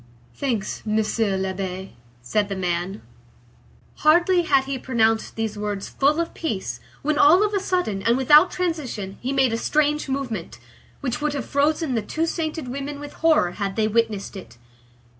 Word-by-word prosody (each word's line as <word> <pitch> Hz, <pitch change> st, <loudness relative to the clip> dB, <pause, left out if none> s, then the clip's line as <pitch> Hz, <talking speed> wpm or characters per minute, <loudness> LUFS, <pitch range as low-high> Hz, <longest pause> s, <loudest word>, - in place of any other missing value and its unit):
"Thanks, 235 Hz, -7 st, -2 dB
Monsieur 215 Hz, -1 st, 0 dB
l'Abbé," 190 Hz, 0 st, -4 dB, 0.3 s
said 205 Hz, -, 0 dB
the 195 Hz, -, -2 dB
man. 180 Hz, +2 st, -2 dB, 0.9 s
Hardly 345 Hz, +4 st, +4 dB
had 280 Hz, -5 st, +3 dB
he 270 Hz, -1 st, -4 dB
pronounced 225 Hz, -3 st, +1 dB
these 220 Hz, -2 st, -3 dB
words 205 Hz, -1 st, -3 dB
full 290 Hz, +4 st, +2 dB
of 335 Hz, -, -2 dB
peace, 190 Hz, -, -3 dB, 0.2 s
when 305 Hz, +1 st, +1 dB
all 345 Hz, +8 st, +7 dB
of 420 Hz, -, -2 dB
a 400 Hz, -, +2 dB
sudden, 360 Hz, -, -1 dB
and 230 Hz, +4 st, +2 dB
without 295 Hz, +6 st, +6 dB
transition, 275 Hz, -, -3 dB
he 255 Hz, -, -2 dB
made 265 Hz, -4 st, +2 dB
a -, -, +1 dB
strange 300 Hz, +1 st, +1 dB
movement, 265 Hz, -5 st, -4 dB, 0.4 s
which 280 Hz, +1 st, -2 dB
would 300 Hz, -1 st, 0 dB
have 280 Hz, -5 st, -3 dB
frozen 295 Hz, 0 st, +1 dB
the 230 Hz, -, +1 dB
two 315 Hz, +10 st, -2 dB
sainted 320 Hz, -3 st, -3 dB
women 280 Hz, +3 st, -5 dB
with 290 Hz, 0 st, -8 dB
horror, 315 Hz, -, +3 dB
had 195 Hz, +1 st, -3 dB
they 220 Hz, -1 st, +2 dB
witnessed 220 Hz, -2 st, -1 dB
it. 150 Hz, -11 st, -10 dB
255 Hz, 165 wpm, -23 LUFS, 205-300 Hz, 0.9 s, all